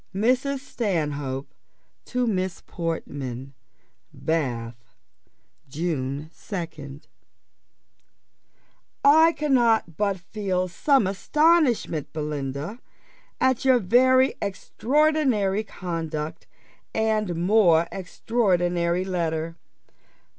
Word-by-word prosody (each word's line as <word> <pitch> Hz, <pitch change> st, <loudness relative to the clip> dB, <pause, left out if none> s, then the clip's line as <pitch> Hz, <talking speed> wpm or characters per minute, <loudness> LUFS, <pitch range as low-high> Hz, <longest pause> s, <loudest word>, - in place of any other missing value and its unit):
MRS. 255 Hz, +6 st, +1 dB
STANHOPE 150 Hz, -, -3 dB, 0.5 s
TO 250 Hz, -1 st, -1 dB
MISS 185 Hz, -5 st, -2 dB
PORTMAN. 140 Hz, -6 st, -5 dB, 0.6 s
"Bath, 115 Hz, -8 st, -3 dB, 0.7 s
June 150 Hz, -1 st, -3 dB
2nd. 155 Hz, -7 st, -7 dB, 2.0 s
"I 320 Hz, +3 st, +7 dB
cannot 240 Hz, -, +2 dB
but 200 Hz, -2 st, 0 dB
feel 185 Hz, -1 st, -2 dB
some 265 Hz, -, +2 dB
astonishment, 250 Hz, -, +2 dB
Belinda, 150 Hz, -, -4 dB, 0.6 s
at 260 Hz, -2 st, +2 dB
your 260 Hz, -1 st, +5 dB
very 255 Hz, +5 st, +4 dB
extraordinary 230 Hz, 0 st, +1 dB
conduct, 165 Hz, -6 st, -5 dB, 0.5 s
and 215 Hz, -4 st, 0 dB
more 175 Hz, -2 st, +4 dB
extraordinary 180 Hz, -3 st, 0 dB
letter. 165 Hz, -3 st, -2 dB
185 Hz, 70 wpm, -25 LUFS, 160-235 Hz, 2.0 s, I